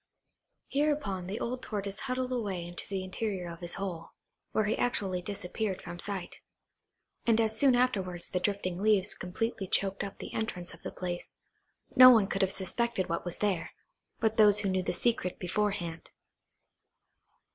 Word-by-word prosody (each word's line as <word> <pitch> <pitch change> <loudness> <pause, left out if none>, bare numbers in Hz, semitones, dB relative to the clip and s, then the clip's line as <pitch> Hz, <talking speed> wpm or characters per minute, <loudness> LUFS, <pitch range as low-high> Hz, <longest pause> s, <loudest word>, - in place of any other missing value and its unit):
Hereupon 280 -11 0
the 205 +4 -3
old 250 +1 -3
Tortoise 200 -3 -4
huddled 255 -1 -2
away 200 -8 -2
into 175 0 -7
the 195 -2 -2
interior 185 -1 -3
of 170 -1 -8
his 175 -1 -2
hole, 180 -4 -5 0.4
where 215 - +2
he 210 +1 +1
actually 195 -7 0
disappeared 200 +1 -3
from 175 - -8
sight; 190 -2 -4 0.9
and 230 -1 +5
as 220 -1 +2
soon 270 -3 +6
afterwards 195 -8 0
the 180 - 0
drifting 185 -2 -1
leaves 210 -2 +3
completely 195 +2 -3
choked 195 +2 +1
up 195 - -6
the - - -8
entrance 180 -6 -3
of - - -14
the - - -5
place, 175 -1 -5 0.6
no 255 0 +11
one 225 -5 +6
could 195 0 -1
have 190 -1 +4
suspected 195 +1 0
what 170 - -1
was 175 - +1
there, 200 -5 -1 0.5
but 220 -1 +1
those 210 -1 +6
who 200 - 0
knew 185 0 +1
the - - -1
secret 185 -2 0
beforehand. 180 -3 -2
195 Hz, 165 wpm, -30 LUFS, 180-220 Hz, 0.9 s, no